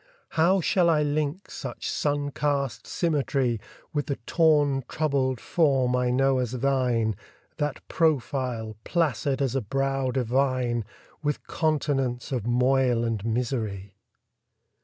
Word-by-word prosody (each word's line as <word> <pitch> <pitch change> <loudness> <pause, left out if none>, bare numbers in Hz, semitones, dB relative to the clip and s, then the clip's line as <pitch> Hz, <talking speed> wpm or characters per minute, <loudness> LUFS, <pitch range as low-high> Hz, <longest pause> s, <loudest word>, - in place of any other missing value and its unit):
How 175 +4 +3
shall 175 +1 +3
I 155 -2 +3
link 150 +4 -2
such - - -6
sun 145 -1 -1
cast 140 -2 -1
symmetry 135 -7 0 0.3
With 145 -1 -1
the 140 - -1
torn 145 -5 +3
troubled 135 -5 0
form 135 -6 +2
I 125 0 +1
know 135 +1 +3
as 125 -1 -2
thine, 125 -4 +1 0.4
That 145 -1 -3
profile, 130 -8 0
placid 145 -4 0
as 130 - 0
a 135 - +1
brow 135 +3 -1
divine, 125 -2 0 0.4
With 150 -2 -2
continents 140 -5 -1
of 120 -4 -2
moil 125 -1 +3
and 115 -4 -2
misery? 110 -4 -2
135 Hz, 120 wpm, -26 LUFS, 125-145 Hz, 0.4 s, How